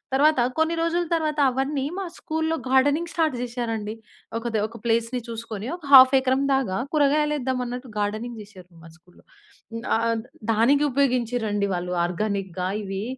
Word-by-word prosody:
తర్వాత 300 +1 +4 0.2
కొన్ని 320 +1 +2
రోజుల 340 +1 0
తర్వాత 310 -2 -1
అవన్నీ, 270 +2 -1
మా 390 - -3
స్కూల్‌లో 320 0 -2
గార్డెనింగ్ 290 +6 +2
స్టార్ట్ 315 -5 +1
చేశారండి. 225 -3 -4 0.4
ఒక 230 - -13
ది - - +2
ఒక 230 +1 -12
ప్లేస్‌ని 230 +2 0
చూసుకొని, 225 -2 -6
ఒక 350 - -24
హాఫ్ 260 0 +10
ఎకరం 260 +1 +1
దాగా 240 -9 -1 0.2
కూరగాయలు 300 0 +2
వేద్దాం 260 -1 -2
అన్నట్టు, 250 +1 -6
గార్డెనింగ్ 220 +3 -3
చేశారు, 195 -4 -14 0.2
మా 165 - -12
స్కూల్‌లో. 175 +1 -23 0.7
ఆహ్, 230 0 0 0.3
దానికి 240 +7 +3
ఉపయోగించిరండి 240 -6 0
వాళ్ళు, 180 0 -3
ఆర్గానిక్‌గా 190 -1 -2
ఇవి 195 0 -4
245 Hz, 145 wpm, -24 LUFS, 215-285 Hz, 0.7 s, హాఫ్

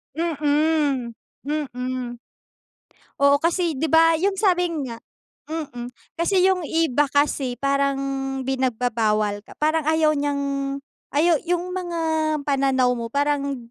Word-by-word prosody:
Mm. 300 -5 +1 0.3
Mm. 255 -4 -4 1.0
Oo, 280 0 +5
kasi 335 +1 +1
di 315 +4 -1
ba 325 +1 +5
yung 390 +2 +1
sabi 360 -3 +2 0.2
nga 230 -2 -7 0.5
mm. 290 -7 -5 0.3
Kasi 365 +2 +3
yung 375 -1 +3
iba 295 -3 +2
kasi 275 -3 0
parang 275 +1 +1 0.5
pinagbabawal 230 -5 0
ka, 205 - -16
parang 310 0 +1
ayaw 315 -1 +3
niyang 280 -1 -1 0.4
ayaw 320 +1 +4
yung 355 +1 -1
mga 350 -2 -3 0.4
pananaw 265 -3 +2
mo 235 -1 -4
parang 280 +1 0
285 Hz, 115 wpm, -23 LUFS, 255-320 Hz, 1.0 s, Oo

